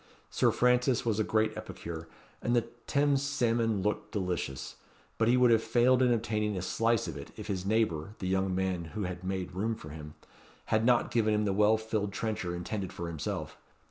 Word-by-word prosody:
Sir - - +3
Francis 125 0 +2
was 110 -2 +1
a - - +3
great 110 +1 +1
epicure, 80 -1 -7 0.3
and 120 - +1
the 120 - +4 0.3
Thames 140 -1 +2
salmon 115 -7 +1
looked 105 +1 -2
delicious; 85 -9 -3 0.4
but 115 - +3
he 125 +2 +5
would 125 -1 +5
have 115 -1 +5
failed 120 +3 +3
in 125 -1 +4
obtaining 105 -3 0
a 90 - -3
slice 115 +3 +1
of - - -5
it, - - -8
if - - -7
his 95 -2 -3
neighbour 105 -4 0
(the 95 - -4
young 95 0 +1
man 95 -2 -1
who 105 - -1
had 90 0 -5
made 95 -1 -3
room 110 +5 -1
for 75 - -10
him) 75 0 -9 0.6
had 110 0 +3
not 120 -1 +3
given 110 -2 +2
him 105 0 +1
the 100 - +1
well 105 +2 +4
filled 110 -2 -2
trencher 100 -5 -2
intended 95 +2 -4
for 85 -1 -5
himself. 80 -3 -4
105 Hz, 200 wpm, -30 LUFS, 95-115 Hz, 0.6 s, he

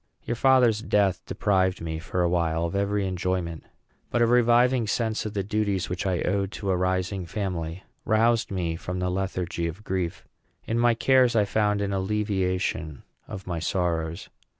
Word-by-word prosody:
Your - - -2
father's 125 -4 +4
death 100 -5 +1
deprived 95 -2 +1
me, 80 -1 -4
for 90 +2 -2
a - - +3
while, 85 -1 0
of 85 - -4
every 100 0 0
enjoyment. 90 -3 -2 0.5
But 120 - +2
a - - +6
reviving 120 0 +4
sense 110 -1 -1
of 105 - -8
the 100 - 0
duties 100 -2 -1
which 90 +2 -2
I 90 -2 0
owed 100 +1 0
to 100 -2 -2
a - - +2
rising 95 0 -1
family 90 -3 -4 0.2
roused 115 +1 +2
me 85 -4 -2
from 90 +2 -5
the 90 0 -1
lethargy 90 -2 -2
of 85 +6 -7
grief. 95 -4 -3 0.4
In 115 +1 -1
my 120 -1 +4
cares 130 0 +4
I 105 -2 +4
found 105 0 +1
an 100 -1 -1
alleviation 95 - -1 0.2
of 95 - -7
my 85 -3 -3
sorrows. 85 -1 -1
95 Hz, 175 wpm, -26 LUFS, 90-110 Hz, 0.5 s, a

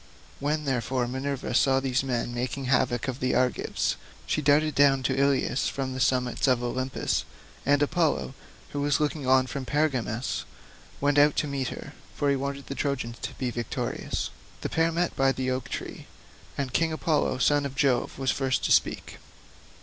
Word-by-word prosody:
When, 150 +2 -1
therefore, 130 -1 0
Minerva 130 +1 -3
saw 135 +2 +4
these 130 -1 +1
men 120 -2 -2
making 125 +2 -3
havoc 125 -2 +1
of 130 0 -3
the 130 0 +1
Argives, 125 0 0 0.3
she 155 - 0
darted 150 +2 +3
down 135 -2 +4
to - - +1
Ilius 140 -1 +2
from 135 -1 -3
the 130 - -4
summits 125 -1 +1
of 125 -2 +3
Olympus, 130 +2 -1 0.4
and 145 0 +4
Apollo, 155 -3 +1 0.4
who 145 - -2
was 145 +1 +2
looking 150 -2 -1
on 130 0 +5
from 135 +1 -5
Pergamus, 130 -5 -1 0.6
went 145 +1 +3
out 145 0 +5
to 150 - 0
meet 135 -2 -2
her; - - -7 0.2
for 145 -1 +1
he - - +3
wanted 140 +1 -4
the - - -5
Trojans 140 -5 -2
to - - -5
be 125 -2 -2
victorious. 120 -2 -3 0.3
The - - -2
pair 165 +1 +2
met 170 +1 0
by 135 0 +3
the 130 -1 -2
oak 130 -1 -3
tree, - - -6 0.5
and 135 -2 -2
King 165 -1 +2
Apollo 155 -4 +1
son 145 +3 +3
of 140 -1 -4
Jove 135 -4 +1
was 135 -1 +1
first 135 -1 0
to - - 0
speak. - - +1
135 Hz, 180 wpm, -27 LUFS, 130-145 Hz, 0.6 s, on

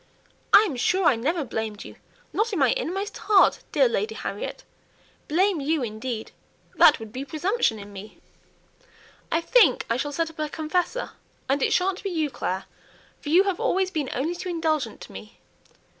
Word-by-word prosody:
"I 415 - +9
am 325 - -3
sure 365 +9 +1
I 270 - +5
never 305 +8 -1
blamed 220 -3 -4
you, - - -11 0.4
not 440 +3 0
in 400 - -2
my - - +4
innermost 400 -4 -3
heart, 410 -2 +4
dear - - +4
Lady 450 -2 -2
Harriet. - - -5 0.6
Blame 360 +1 +2
you, 300 0 0
indeed! 225 0 -5 0.4
That 300 - +6
would 220 -1 -10
be 260 - -4
presumption 315 - 0
in 205 0 -10
me." 200 +2 -10 1.1
"I 330 - +2
think 335 - +4
I 230 - +2
shall 290 +3 -2
set 325 +2 -2
up 320 - -20
a 305 -1 -1
confessor! 345 +11 -2 0.4
and 275 +1 +1
it - - +2
sha'n't 375 +1 +1
be 395 - -3
you, 315 -5 -1
Clare, 190 -5 -3 0.6
for 290 - -6
you 350 +5 +6
have 390 -3 -1
always 375 0 +1
been 300 -6 -2
only 295 +7 -1
too 360 +1 -6
indulgent 320 -3 -1
to - - -10
me." - - -11
320 Hz, 180 wpm, -25 LUFS, 260-380 Hz, 1.1 s, I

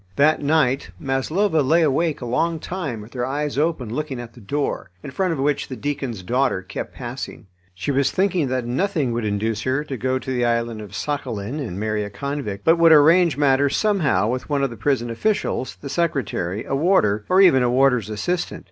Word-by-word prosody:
That 155 +2 +3
night 140 -3 +1
Maslova 155 +6 +1
lay 160 +5 +3
awake 155 +1 +1
a - - -4
long 165 +8 0
time 150 - -4
with 105 +3 -13
her 125 -2 -2
eyes 145 +3 -2
open 140 -6 -1
looking 145 -2 -3
at 120 -1 -8
the - - -14
door, 140 -1 -2
in 140 - -7
front 185 +5 0
of 165 - -2
which 145 +1 0
the 130 - -6
deacon's 130 -5 -4
daughter 125 -2 0
kept - - -7
passing. - - -7 0.3
She 95 +10 -2
was 140 0 +2
thinking 185 -6 +1
that 130 -1 -2
nothing 145 +1 0
would 115 -1 -2
induce 105 +2 -1
her 130 +5 0
to 135 -3 -5
go 130 +2 0
to 130 - -5
the 125 -1 0
island 115 -2 0
of 105 -1 -10
Sakhalin 130 -3 -3
and 110 -10 -5
marry 110 0 -1
a 105 - -5
convict, 105 -2 -5
but 165 +1 +5
would 165 -1 +6
arrange 160 +1 +6
matters 140 -1 +3
somehow 195 - +2
with 125 +5 -3
one 140 -2 +1
of 135 - 0
the - - -7
prison 120 +1 0
officials, 130 - -1
the 140 - -6
secretary, 135 - -2
a - - -4
warder, 135 - +2
or 185 - +4
even 175 -9 +6
a 125 - +2
warder's 125 -4 +3
assistant. 175 +12 -2
135 Hz, 205 wpm, -22 LUFS, 115-155 Hz, 0.3 s, would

